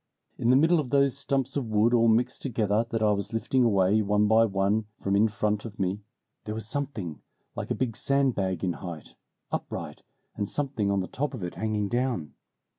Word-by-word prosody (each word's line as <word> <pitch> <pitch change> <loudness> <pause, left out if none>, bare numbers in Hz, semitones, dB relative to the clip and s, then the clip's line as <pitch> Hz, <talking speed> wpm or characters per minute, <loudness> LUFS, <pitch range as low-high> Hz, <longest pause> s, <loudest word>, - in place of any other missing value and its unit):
In 115 - +1
the 125 - +6
middle 160 +5 +5
of 140 -5 -3
those 140 0 +3
stumps 135 -1 -1
of 130 -6 -2
wood 110 +3 +3
all 115 -1 +5
mixed 120 +3 +2
together 110 -3 0
that 115 -1 -1
I 105 - +4
was 100 +2 -2
lifting 120 +3 +1
away 100 -1 +3
one 105 0 +2
by 110 +1 +5
one 100 +1 +1
from 100 0 0
in 105 +2 +5
front 105 -1 -1
of 110 -2 -8
me, 95 +2 -1 0.4
there 105 - -4
was 110 -1 -5
something 115 - -4 0.3
like - - -5
a - - 0
big 120 -4 -2
sandbag 115 - 0
in 90 -2 +1
height, 85 -3 -8 0.4
upright, - - -5 0.3
and 100 -1 -2
something 135 -8 -1
on 100 -1 +1
the 90 - -4
top 145 +1 -3
of 110 - -7
it 90 - -4
hanging 105 -2 -1
down. 120 - -1
110 Hz, 200 wpm, -27 LUFS, 100-125 Hz, 0.4 s, the